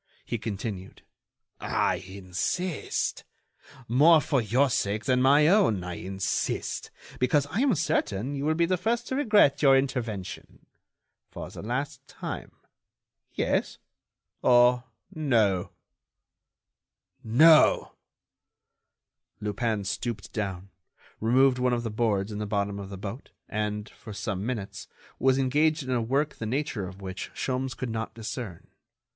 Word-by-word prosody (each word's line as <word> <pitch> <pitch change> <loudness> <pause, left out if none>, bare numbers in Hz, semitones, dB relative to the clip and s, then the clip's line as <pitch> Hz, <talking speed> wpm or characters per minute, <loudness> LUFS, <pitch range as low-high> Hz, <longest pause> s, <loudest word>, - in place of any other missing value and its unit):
He 120 - -3
continued: 100 -3 -6 0.6
"I 95 - 0
insist. 95 - -3 0.6
More 155 +8 +6
for 140 -3 +1
your 120 +6 +2
sake 105 0 -1
than 130 -2 +2
my 145 +3 +5
own, 175 - +3
I 90 0 -5
insist, 95 +2 -3 0.3
because 135 +3 +2
I 200 - -1
am 260 -5 +3
certain 145 - -1
you 140 0 -3
will 155 +1 +2
be 170 +1 +3
the 185 +2 +1
first 225 +6 -1
to 260 - -1
regret 210 - +4
your 135 -2 +6
intervention. 120 -8 -4 0.6
For - - -8
the - - -8
last 125 +6 -4
time, - - -6 0.8
yes - - 0 0.6
or 125 0 +5 0.3
no?" 115 - +1 1.5
"No." 155 +8 +6 1.5
Lupin 105 0 -1
stooped 100 +1 -4
down, 95 -3 -4 0.5
removed 125 +3 +3
one 125 0 +2
of 120 -1 -1
the 115 - -3
boards 105 -2 0
in 105 - -5
the 105 - -3
bottom 100 -1 -1
of 100 -1 -7
the 100 - -7
boat, 105 +7 -7 0.2
and, 105 0 -3
for 110 - -11
some 100 -2 -3
minutes, 110 -6 -5 0.3
was 130 0 +3
engaged 150 +4 +2
in 130 - -4
a 125 -2 +1
work 140 +6 0
the 110 - -4
nature 125 -6 -2
of 95 +2 -11
which 95 -1 -6
Sholmes 130 -1 -2
could 125 -3 -3
not 110 0 -4
discern. 110 -4 -6
120 Hz, 135 wpm, -27 LUFS, 100-140 Hz, 1.5 s, More